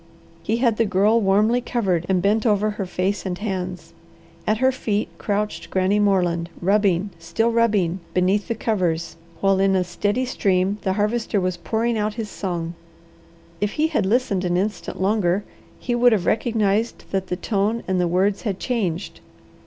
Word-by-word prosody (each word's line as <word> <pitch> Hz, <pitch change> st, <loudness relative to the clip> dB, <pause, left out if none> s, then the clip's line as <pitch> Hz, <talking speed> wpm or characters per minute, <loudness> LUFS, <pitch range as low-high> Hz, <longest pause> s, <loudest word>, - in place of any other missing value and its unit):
He 220 Hz, +6 st, -1 dB
had 235 Hz, -3 st, +2 dB
the 230 Hz, -, +3 dB
Girl 210 Hz, +3 st, +3 dB
warmly 210 Hz, +5 st, +3 dB
covered 190 Hz, -9 st, -1 dB
and 185 Hz, -2 st, +2 dB
bent 210 Hz, +2 st, +2 dB
over 210 Hz, -2 st, +2 dB
her 205 Hz, -2 st, -4 dB
face 185 Hz, +2 st, -1 dB
and 180 Hz, -2 st, -3 dB
hands. 185 Hz, -4 st, -4 dB, 0.5 s
At 215 Hz, -, +2 dB
her 260 Hz, +3 st, +3 dB
feet 215 Hz, -5 st, -2 dB
crouched 210 Hz, 0 st, -2 dB
Granny 190 Hz, +2 st, +2 dB
Moreland, 180 Hz, -4 st, +1 dB
rubbing, 195 Hz, 0 st, +2 dB
still 225 Hz, +7 st, 0 dB
rubbing, 205 Hz, -6 st, +2 dB, 0.2 s
beneath 185 Hz, +3 st, +2 dB
the 230 Hz, -, -1 dB
covers, 180 Hz, -7 st, -1 dB, 0.3 s
while 195 Hz, -1 st, +3 dB
in 195 Hz, 0 st, +3 dB
a 185 Hz, -, +2 dB
steady 205 Hz, +8 st, -1 dB
stream 195 Hz, -4 st, 0 dB
the 190 Hz, -, 0 dB
Harvester 210 Hz, +1 st, 0 dB
was 185 Hz, -1 st, -1 dB
pouring 225 Hz, +5 st, -1 dB
out 210 Hz, 0 st, -1 dB
his 225 Hz, -3 st, -5 dB
song. 170 Hz, -3 st, -3 dB, 0.9 s
If 205 Hz, 0 st, -1 dB
he 315 Hz, +1 st, +1 dB
had 220 Hz, -12 st, 0 dB
listened 205 Hz, -4 st, +1 dB
an 175 Hz, -1 st, +1 dB
instant 205 Hz, +3 st, -3 dB
longer 195 Hz, -1 st, +1 dB, 0.3 s
he 245 Hz, -, -3 dB
would 240 Hz, 0 st, +5 dB
have 190 Hz, -5 st, 0 dB
recognized 220 Hz, -1 st, 0 dB
that 190 Hz, -1 st, -1 dB
the 180 Hz, -, -2 dB
tone 210 Hz, +3 st, -1 dB
and 185 Hz, -1 st, +1 dB
the 175 Hz, -, +2 dB
words 190 Hz, +4 st, +1 dB
had 200 Hz, -5 st, -3 dB
changed. 200 Hz, -8 st, -2 dB
200 Hz, 170 wpm, -22 LUFS, 185-220 Hz, 0.9 s, would